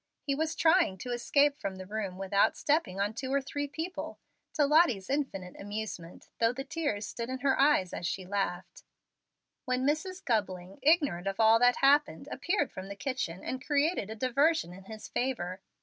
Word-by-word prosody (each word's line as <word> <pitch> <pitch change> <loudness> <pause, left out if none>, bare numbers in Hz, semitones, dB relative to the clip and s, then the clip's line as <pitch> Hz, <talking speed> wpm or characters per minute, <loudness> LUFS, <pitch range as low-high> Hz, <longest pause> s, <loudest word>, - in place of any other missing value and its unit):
He 280 - 0
was 315 +3 -1
trying 325 - +3
to 245 +7 -6
escape 280 +4 +2
from 195 -1 -4
the 185 0 -8
room 200 -2 -4
without 200 +2 +2
stepping 285 - 0
on 205 +2 0
two 260 +3 -5
or 280 - +3
three 285 +1 -4
people 325 +6 -5 0.4
to 295 - +3
Lottie's 280 - +3
infinite 195 -11 -2
amusement, 205 -4 -6
though 230 0 +4
the 270 +2 -5
tears 285 -9 -2
stood 235 +3 -5
in 260 0 -4
her 275 -1 +2
eyes 275 -11 +3
as 175 - -3
she 185 +1 -3
laughed 185 -2 -3 0.8
when 255 0 0
Mrs. 340 +6 -1
Gubling, 190 -5 -2
ignorant 290 - +3
of 195 +1 -3
all 225 0 +6
that 245 +1 +5
had 275 - +3
happened, 295 +2 +3
appeared 360 -5 0
from 185 +1 -7
the 200 - -7
kitchen, 250 -8 -3
and 260 +1 -4
created 290 - +1
a 220 - -5
diversion 260 - +1
in 190 +1 -13
his 220 +1 -9
favor. 190 -8 -2
245 Hz, 185 wpm, -30 LUFS, 195-290 Hz, 0.8 s, all